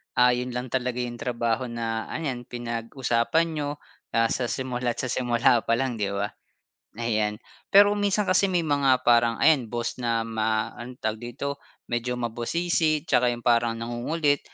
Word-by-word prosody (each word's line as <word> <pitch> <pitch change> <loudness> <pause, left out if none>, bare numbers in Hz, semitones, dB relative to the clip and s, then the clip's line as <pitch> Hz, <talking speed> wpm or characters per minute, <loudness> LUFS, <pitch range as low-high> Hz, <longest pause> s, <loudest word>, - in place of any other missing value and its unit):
ah, 125 0 +6
yun 125 0 -2
lang 125 0 -4
talaga 125 -1 -1
yung 120 -1 -5
trabaho 120 -2 -1
na 115 -1 -3
ayan 130 -6 -4
pinag-usapan 120 +5 0
niyo, 150 -2 -2 0.5
ah, 115 0 +3
sa 125 -2 -1
simula't 125 -2 -2
sa - - -4
simula 120 -1 +3
pa 115 - +1
lang, 125 -2 -2
'di 100 -1 -1
ba? 100 +1 -2 0.7
Ayan. 110 -2 0 0.3
Pero 205 +1 +7
minsan 205 0 +1
kasi 190 +1 +3
may 175 -2 +1
mga 140 -4 +2
parang 120 -1 +4
ayan 140 -8 +3
boss 120 +1 -3
na 115 -2 0
ma 110 -1 -1
ano 120 +1 -9
tawag 110 -2 -3
dito, 140 +4 -5 0.3
medyo 125 +1 -1
mabusisi 155 +7 0
tsaka 125 -7 +3
yung 120 -1 -3
parang 115 -1 +3
nangungulit, 135 +6 0
120 Hz, 160 wpm, -26 LUFS, 115-135 Hz, 0.7 s, Pero